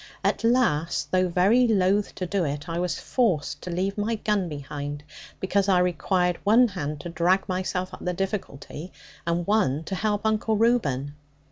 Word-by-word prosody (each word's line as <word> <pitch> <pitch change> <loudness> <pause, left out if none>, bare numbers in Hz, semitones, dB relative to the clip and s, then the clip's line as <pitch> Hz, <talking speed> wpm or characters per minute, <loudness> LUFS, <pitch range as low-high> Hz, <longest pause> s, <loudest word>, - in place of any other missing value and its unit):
At - - 0
last, 230 -10 +1
though 185 0 +3
very 200 +8 +4
loath 200 -1 +2
to 185 - -3
do 190 +1 0
it, 145 -1 -3
I 170 0 -2
was 180 -1 -1
forced 155 - 0
to - - -7
leave 190 +4 -2
my 225 +3 0
gun 210 -4 0
behind, 145 0 -6 0.4
because 195 +1 +1
I 185 - +5
required 180 0 +1
one 230 +4 +5
hand 150 -6 -4
to 175 - -6
drag 175 +3 +1
myself 185 0 -2
up - - -9
the 180 - 0
difficulty, 180 -3 -5 0.4
and 170 0 0
one 175 -8 +1
to 195 - -6
help 210 +2 -1
Uncle 220 0 +1
Reuben. 145 - +1
185 Hz, 170 wpm, -25 LUFS, 165-210 Hz, 0.4 s, I